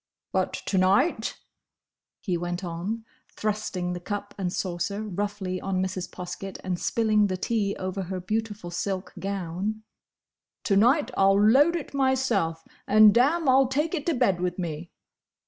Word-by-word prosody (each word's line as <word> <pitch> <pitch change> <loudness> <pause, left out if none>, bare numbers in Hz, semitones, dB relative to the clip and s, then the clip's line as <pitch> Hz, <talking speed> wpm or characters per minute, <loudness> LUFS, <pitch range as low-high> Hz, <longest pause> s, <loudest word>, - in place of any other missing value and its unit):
"But - - 0
to 190 - +1
night," 200 - +2 0.8
he 185 -5 -1
went 175 +2 -3
on, 185 +7 -4 0.3
thrusting 205 -4 -2
the 175 - -4
cup 205 +2 -5
and 185 -3 -2
saucer 185 +4 -2
roughly 200 -2 -3
on 190 -1 -1
Mrs. 185 -1 -2
Poskett 185 +2 -7
and 180 -2 -2
spilling 215 -2 +2
the 185 -1 -2
tea 200 0 0
over 185 +1 -3
her 185 0 -4
beautiful 210 -1 -3
silk 190 +2 -3
gown, 195 +2 -3 0.8
"to 200 - +2
night, 250 +5 +4
I'll 195 0 +4
load 270 +11 +5
it 325 -4 -5
myself! 260 -12 +1 0.2
and, 215 0 +7
damme! 290 +7 +3
I'll 265 0 +5
take 295 +6 -1
it 310 -3 -3
to 335 - +2
bed 195 -8 +2
with 180 -1 -1
me!" 170 -2 -4
200 Hz, 150 wpm, -26 LUFS, 180-225 Hz, 0.8 s, and